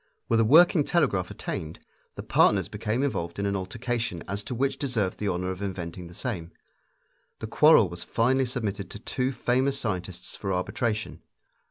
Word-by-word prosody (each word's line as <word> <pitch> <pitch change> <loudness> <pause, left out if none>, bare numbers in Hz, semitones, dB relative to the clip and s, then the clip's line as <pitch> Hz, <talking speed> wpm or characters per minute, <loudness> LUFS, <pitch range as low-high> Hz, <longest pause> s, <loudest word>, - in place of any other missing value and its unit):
With 115 - +2
a - - +5
working 160 +6 +6
telegraph 120 - +1
attained, 80 +1 -5 0.4
the - - -6
partners - - +3
became 115 +5 -2
involved 85 -11 -2
in 100 - -1
an 100 0 0
altercation 115 -1 -3
as 100 +1 -3
to 125 - -4
which 135 +2 0
deserved 115 -9 -1
the 105 - -2
honor 90 0 -1
of 95 +1 -7
inventing 90 -3 -5
the 85 - -13
same. 90 -10 -4 0.9
The - - -6
quarrel 115 -1 +6
was 85 0 -7
finally 130 +3 +1
submitted 105 -6 -3
to - - -8
two 125 +4 -2
famous 130 +2 +1
scientists 90 -6 -4
for 95 - -4
arbitration. 110 +4 -2
105 Hz, 170 wpm, -27 LUFS, 95-125 Hz, 0.9 s, working